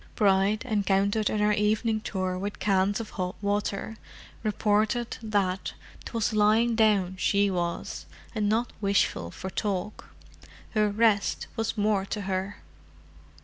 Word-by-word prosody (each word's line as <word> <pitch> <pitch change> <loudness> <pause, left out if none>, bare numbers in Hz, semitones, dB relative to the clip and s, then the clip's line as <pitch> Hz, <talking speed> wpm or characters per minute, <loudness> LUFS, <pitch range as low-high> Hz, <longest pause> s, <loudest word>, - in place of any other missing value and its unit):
Bride, 200 +2 +2
encountered 205 -1 +1
in - - -1
her 210 0 +3
evening 215 +2 +1
tour 185 -3 -2
with 200 +3 -4
cans 195 +1 +1
of 225 - -6
hot 180 -1 -3
water, 205 +1 -2 0.4
reported 215 +2 +1
that 200 -4 -1 0.3
'twas 230 -1 -1
lying 215 +3 +4
down 205 -5 +2
she 200 +1 +2
was, 175 -2 -3 0.3
and 210 -2 0
not 230 +3 0
wishful 200 - +1
for 190 - -7
talk: 205 0 -3 0.7
her 215 -2 +2
resht 210 -1 +2
was 225 -1 -2
more 205 -2 +2
to 210 - -3
her. 195 +1 -3
205 Hz, 130 wpm, -27 LUFS, 195-215 Hz, 0.7 s, lying